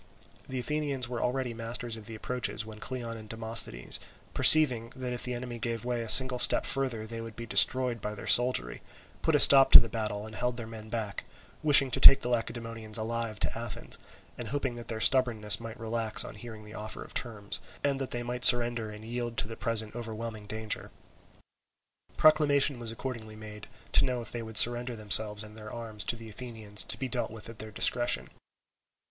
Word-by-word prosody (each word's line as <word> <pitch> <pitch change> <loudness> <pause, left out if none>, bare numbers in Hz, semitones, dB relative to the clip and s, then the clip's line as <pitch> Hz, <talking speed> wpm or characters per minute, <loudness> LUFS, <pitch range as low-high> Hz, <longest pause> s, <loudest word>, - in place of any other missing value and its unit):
The 130 - -6
Athenians 140 -1 -2
were 120 -1 -6
already 125 -1 -3
masters 115 +1 -5
of 110 -2 -11
the 115 - -9
approaches 110 -2 -3
when 110 -1 -12
Cleon 120 -2 -7
and 110 -1 -13
Demosthenes 110 - 0 0.3
perceiving 125 -7 +6
that, 125 -2 -6
if 125 - -5
the 125 0 -3
enemy 120 -1 -8
gave 115 0 -5
way 120 -1 -3
a 115 - -7
single 130 0 +6
step - - +5
further, 130 -5 -2
they 115 +1 -8
would 115 -1 -10
be 115 - -8
destroyed 125 0 +4
by 105 0 -6
their - - -11
soldiery, 120 - +1 0.4
put - - 0
a - - +3
stop 135 -1 +8
to - - +13
the 115 - -4
battle 105 -2 -5
and 110 - -12
held 125 +1 -4
their 115 - -7
men 110 -1 -11
back; 110 -4 -5 0.4
wishing 140 -3 +4
to - - -1
take 135 - +8
the 125 - -4
Lacedaemonians 115 -2 -2
alive 115 -1 -5
to - - -2
Athens, 115 -2 -6 0.4
and 120 - -6
hoping 135 0 -4
that 120 -1 -11
their 110 - -6
stubbornness 115 -4 +2
might 115 +1 -10
relax 115 -1 -1
on - - -10
hearing 110 0 -12
the 105 - -13
offer 110 0 -8
of - - -15
terms, 105 -4 -2 0.2
and 140 -1 -1
that 135 - -4
they 120 0 -5
might 120 0 -6
surrender 120 -2 +5
and 105 +1 -12
yield 120 0 -6
to 105 - 0
the 115 - -9
present 110 -1 -3
overwhelming 110 -2 -8
danger. 110 0 -3 1.3
Proclamation 145 -3 +3
was 115 -1 -3
accordingly 115 -3 -8
made, 105 -1 -12 0.2
to - - +4
know 125 -1 -2
if 115 - -12
they 120 - -6
would 110 -1 -6
surrender 120 +2 +4
themselves 105 0 +4
and 105 0 -13
their 110 -1 -11
arms 110 -3 -5
to - - -2
the 115 -1 -12
Athenians 110 -2 0
to - - +1
be 130 - -5
dealt 120 - -3 0.2
at 115 -1 -13
their 110 - -8
discretion. 120 +4 +1
115 Hz, 200 wpm, -28 LUFS, 110-125 Hz, 1.3 s, to